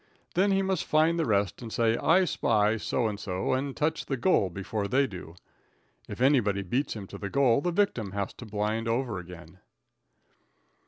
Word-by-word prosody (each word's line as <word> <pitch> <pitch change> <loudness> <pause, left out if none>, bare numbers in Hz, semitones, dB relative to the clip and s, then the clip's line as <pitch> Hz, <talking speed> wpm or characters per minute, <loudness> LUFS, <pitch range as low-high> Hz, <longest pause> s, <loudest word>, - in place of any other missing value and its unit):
Then 190 +3 +3
he 195 0 +2
must 190 -2 -1
find 160 +2 +2
the 165 - 0
rest 100 -2 0
and 115 -2 -7
say 115 0 +2
"I 180 +9 +3
spy" 110 -8 +1
so 120 +3 -1
and 105 -2 -4
so 95 +3 -2
and 135 +1 -2
touch 155 +1 -1
the 135 - -1
"goal" 120 - +2
before 100 +3 -4
they 135 +5 +2
do. 90 -7 -9 0.7
If - - -7
anybody 115 -8 +3
beats 125 +10 -1
him 105 -3 -6
to - - -10
the 100 - -4
goal 135 +1 +3
the 175 - 0
victim 175 - 0
has 100 -1 -3
to 120 - -8
"blind" 105 +2 -2
over 115 -3 -1
again. 90 0 -12
115 Hz, 190 wpm, -28 LUFS, 100-140 Hz, 0.7 s, Then